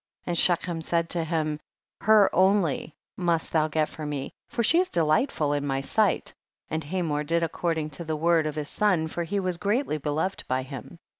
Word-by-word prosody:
And 175 - -1
Shechem 170 -1 +2
said 165 +1 -1
to 170 -2 0
him, 155 -2 -1 0.4
her 215 -2 +6
only 185 -5 +2 0.2
must 170 -3 0
thou 155 -1 +3
get 155 0 0
for 155 - -9
me, 145 -2 -4 0.2
for 235 - -1
she 330 +9 +5
is 365 - +1
delightful 155 - +1
in 145 -1 -1
my 135 -1 0
sight; 195 +7 +1 0.4
and 160 +1 -1
Hamor 150 -2 -1
did 165 +3 0
according 160 -2 -1
to 145 +4 -7
the 160 -1 -2
word 165 0 +2
of 155 - -4
his 150 -1 -4
son, 190 -7 +1
foi; 170 +2 -3
he 200 +4 0
was 185 -2 -1
greatly 205 - 0
beloved 155 +6 -2
by 130 0 0
him. 135 +5 -9
165 Hz, 195 wpm, -26 LUFS, 150-180 Hz, 0.4 s, her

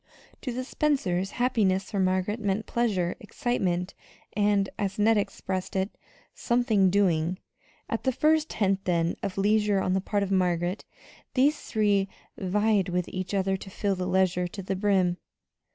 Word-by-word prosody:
To 255 - -3
the 255 +2 -3
Spencers, 225 -11 0
happiness 205 -6 +1
for 200 - -1
Margaret 185 +3 +1
meant 205 0 -1
pleasure, 195 -7 0
excitement, 195 -6 -1 0.4
and 205 -1 +2
as 200 -2 -2
Ned 220 +2 +4
expressed 190 -1 -3
it 190 +2 -1 0.4
"something 225 -5 +2
doing." 180 -3 +2 0.5
At - - -2
the 260 - +1
first 310 +4 +2
hint, 195 -2 0
then, 170 -1 +1
of 190 - -4
leisure 210 0 +3
on 185 -1 0
the 190 - +1
part 205 +1 0
of 195 - -3
Margaret, 180 0 0 0.5
these 290 +3 +3
three 205 -3 +1 0.3
vied 205 0 +1
with 180 0 -1
each 185 +2 -4
other 195 0 +1
to 195 - -10
fill 200 +1 -1
that 180 -1 -3
leisure 185 -1 +2
to 195 +2 -8
the 190 +1 -2
brim. 190 -3 +2
195 Hz, 155 wpm, -27 LUFS, 185-215 Hz, 0.5 s, Ned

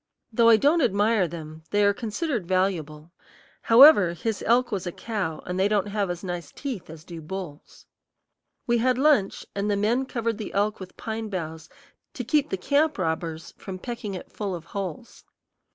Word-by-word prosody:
Though 230 +1 +5
I 225 - +8
don't 295 +9 +3
admire 210 -4 +2
them, 160 -1 -8
they 205 0 +3
are 200 - +4
considered 230 - -3
valuable; 170 -4 -1 0.5
however, 230 - +7
his 205 +5 -3
elk 245 +2 +3
was 190 -3 -3
a - - -2
cow, 195 -7 -4
and 180 +1 -3
they 195 - +4
don't 205 -1 0
have 200 -2 -1
as 175 +1 -4
nice 175 -4 -5
teeth 255 - -6
as 160 -1 -10
do 170 -1 -9
bulls. 170 -2 -8 0.8
We 240 -1 +2
had 250 +1 +2
lunch, 270 -8 +2
and 200 +1 -2
the 205 - +1
men 235 +6 +1
covered 230 -3 -2
the 215 - -6
elk 205 +1 0
with 185 -1 -10
pine 220 -1 -4
boughs 160 -4 -5 0.5
to 250 - -4
keep 295 +4 +1
the 190 - -2
camp 285 +9 +1
robbers 160 -2 -3
from 190 -2 -7
pecking 215 -2 -5
it 180 - -9
full 200 -3 -3
of 165 -2 -9
holes. 195 +5 -6
200 Hz, 185 wpm, -25 LUFS, 175-230 Hz, 0.8 s, I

